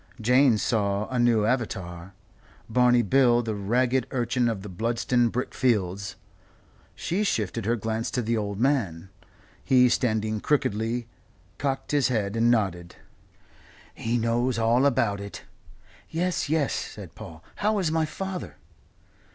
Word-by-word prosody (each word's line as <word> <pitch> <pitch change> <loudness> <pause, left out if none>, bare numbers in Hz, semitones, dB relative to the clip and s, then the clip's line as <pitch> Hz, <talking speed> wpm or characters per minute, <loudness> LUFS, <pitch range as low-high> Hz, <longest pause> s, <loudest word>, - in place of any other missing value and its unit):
Jane 125 +1 +4
saw 100 -2 0
a 125 - -1
new 115 -3 +3
avatar; 95 -7 -3 0.5
Barney 125 +1 +4
Bill 120 +1 +4
the 110 -1 -2
ragged 120 +5 +1
urchin 125 -1 0
of 105 -4 -4
the - - -7
Bludston 115 +5 0
brick 125 +3 -3
fields. 100 -5 0 0.8
She 190 +5 -1
shifted 105 - -1
her 120 - +2
glance 110 +1 -2
to 120 +1 -2
the 115 +1 0
old 100 -2 -3
man. 105 - 0 0.5
He, 125 -2 +5
standing 110 -3 0
crookedly, 115 -3 0 0.5
cocked 135 -1 -2
his 145 -3 +3
head 105 -4 -1
and 115 +1 +3
nodded. 95 -7 0 1.0
"He 115 +2 -1
knows 120 +2 0
all 115 +4 +3
about 115 -7 +1
it." 100 0 -8 0.7
"Yes, 175 -2 -1
yes," 155 -4 +1
said - - -6
Paul. 80 +1 -11
"How 210 +1 +1
is 180 -6 0
my 160 -1 +1
father?" 190 +3 -6
115 Hz, 135 wpm, -26 LUFS, 105-130 Hz, 1.0 s, He